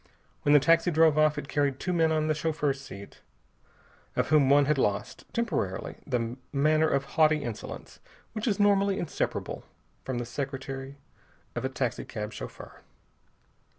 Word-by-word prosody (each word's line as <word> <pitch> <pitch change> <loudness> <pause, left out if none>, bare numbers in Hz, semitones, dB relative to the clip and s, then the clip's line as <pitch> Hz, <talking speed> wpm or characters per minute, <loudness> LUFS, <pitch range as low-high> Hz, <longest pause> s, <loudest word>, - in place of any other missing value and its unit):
When 145 - +3
the 145 - +8
taxi 165 +4 +4
drove 160 -2 +4
off, 155 -1 +4
it 145 - -4
carried 140 -2 0
two 180 - -2
men 165 -2 +3
on 155 -1 +1
the 155 - +2
chauffeur's 150 -3 -1
seat, 100 -7 -11 0.9
of - - 0
whom 145 -3 +5
one 140 0 +6
had 150 -1 +1
lost, 100 -4 -1
temporarily, 225 - -2
the 120 -2 -1
manner 155 +2 +3
of 140 0 +1
haughty 155 +1 +3
insolence 115 -4 -7 0.3
which 215 +2 -3
is 205 -3 +1
normally 200 -1 +3
inseparable 170 -7 -3 0.4
from 130 -2 -3
the 120 - -2
secretary 135 +1 -5 0.6
of - - -3
a - - 0
taxicab 105 0 -3
chauffeur. - - -9
145 Hz, 150 wpm, -28 LUFS, 135-160 Hz, 0.9 s, the